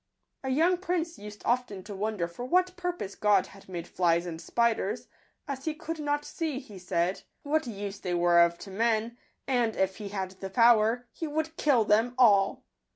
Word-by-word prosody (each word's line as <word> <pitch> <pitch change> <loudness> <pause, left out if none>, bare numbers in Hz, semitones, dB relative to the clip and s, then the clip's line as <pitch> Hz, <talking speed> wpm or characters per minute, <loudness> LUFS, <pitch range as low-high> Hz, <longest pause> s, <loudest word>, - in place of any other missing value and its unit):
A 265 - -2
young 335 +7 +3
prince 345 -2 -2
used 210 0 -10
often 240 -6 0
to 205 - -8
wonder 200 -3 -2
for 170 +8 -8
what 365 +7 +2
purpose 355 - -4
God 210 -1 +3
had 195 -1 -16
made 175 -2 -5
flies 170 -1 +1
and 165 -2 -6
spiders, 230 +1 0 0.4
as 275 -1 -5
he 315 -1 -1
could 325 +1 -5
not 295 0 -1
seef 305 -5 -4
he 200 -3 -10
said, 180 +1 -1 0.2
what 305 -1 0
use 200 -2 -5
they 180 -1 -2
were 175 0 +4
of 170 0 +4
to 195 - -10
men, 225 +2 0 0.3
and, 245 -4 +1
if 190 0 0
he 205 -2 -6
had 190 -2 -3
the 190 0 -7
power, 230 +2 +4
he 325 - -5
would 315 +2 -2
kill 260 -9 +3
them 225 +4 +3
all. 205 -6 +4
220 Hz, 190 wpm, -29 LUFS, 195-290 Hz, 0.4 s, were